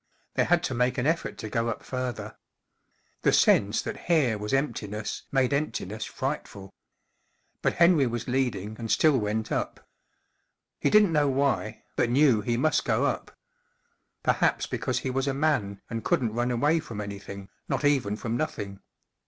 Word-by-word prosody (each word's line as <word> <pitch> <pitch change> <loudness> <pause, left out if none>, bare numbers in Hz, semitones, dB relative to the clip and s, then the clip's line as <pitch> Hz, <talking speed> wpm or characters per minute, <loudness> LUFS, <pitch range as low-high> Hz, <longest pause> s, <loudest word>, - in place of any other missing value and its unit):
They - - +2
had - - +3
to - - -1
make 125 +2 +1
an 125 - 0
effort 165 +2 0
to 110 - -6
go 115 +2 -1
up 115 - -4
further. 125 -3 -4 0.9
The - - +3
sense 105 +1 +4
that - - -6
here 150 -10 +3
was 105 0 -4
emptiness 110 -7 -2
made 135 0 +2
emptiness 110 -7 -2
frightful. 120 -8 -5 0.9
But - - +1
Henry 170 -6 +5
was 120 -1 -4
leading 120 -6 -1
and 115 -1 -5
still 150 0 +4
went 110 +1 -2
up. - - -3 0.9
He - - +2
didn't 210 -5 +5
know 145 -2 +3
why, 135 +1 0
but 120 - +1
knew 130 -3 +4
he 115 +3 -1
must 155 +5 +2
go - - +1
up. - - -3 0.9
Perhaps - - +2
because - - -2
he 130 - -2
was 135 +2 -1
a 135 - 0
man 120 -10 0
and 115 -1 -4
couldn't 115 -4 +1
run 120 +2 0
away 145 +7 +2
from 115 -8 -7
anything, 100 -1 -7 0.2
not - - 0
even 130 -8 +2
from 115 +1 -3
nothing. 105 -8 -3
120 Hz, 165 wpm, -27 LUFS, 105-140 Hz, 0.9 s, Henry